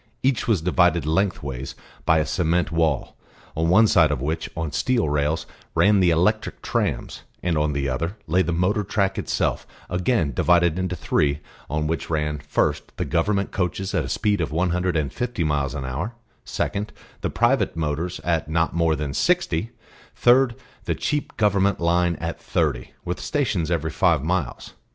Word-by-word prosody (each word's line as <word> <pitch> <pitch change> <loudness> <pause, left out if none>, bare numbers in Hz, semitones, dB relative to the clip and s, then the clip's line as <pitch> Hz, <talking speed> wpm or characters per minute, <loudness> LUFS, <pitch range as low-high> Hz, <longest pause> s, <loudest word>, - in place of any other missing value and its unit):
Each 130 -2 +1
was 100 -9 +2
divided 90 -2 +3
length 95 +4 0
ways 65 -1 -5 0.3
by 80 - +5
a 75 - +2
cement 85 -1 0
wall, 80 -4 0 0.4
on 80 +1 +1
one 110 +6 +6
side 80 -7 +5
of 75 -3 -1
which, 80 +4 -2
on 80 -2 -2
steel 120 - +1
rails, 75 +2 0 0.3
ran 105 0 +5
the 90 -2 +4
electric 90 +7 +1
trams, - - -2 0.2
and 90 -2 +1
on 75 -1 +1
the 70 0 -1
other 85 - -2
lay 90 +4 +2
the 85 - 0
motor 90 +5 +1
track 95 -1 0
itself - - -1 0.2
again 90 - +1
divided 85 +4 +3
into 90 -1 -1
three, 70 -4 +1 0.3
on 75 +2 -1
which 80 +2 -2
ran, 75 -2 -1
first - - -1
the - - -1
Government 100 +4 0
coaches 95 +1 -2
at - - +1
a - - -6
speed 105 -3 +1
of 80 - -2
one 85 +3 +1
hundred 90 -1 0
and 70 -4 -1
fifty 120 -7 -2
miles 75 -2 0
an 70 -3 -4
hour, 75 - -4 0.3
second 105 +1 -3 0.3
the - - -1
private 120 -2 +2
motors 80 +2 -2
at 80 -3 0
not 80 +1 +1
more 85 -2 +2
than 75 -1 -3
sixty, 145 - +1 0.5
third 125 0 +4 0.3
the - - 0
cheap 150 -1 -2
Government 100 -2 +2
line 85 0 +2
at 85 +1 -5
thirty, - - -1
with 90 +1 -3
stations 105 - -1
every 80 -2 -1
five 80 -3 +2
miles. 80 -7 -2
85 Hz, 175 wpm, -23 LUFS, 75-95 Hz, 0.5 s, one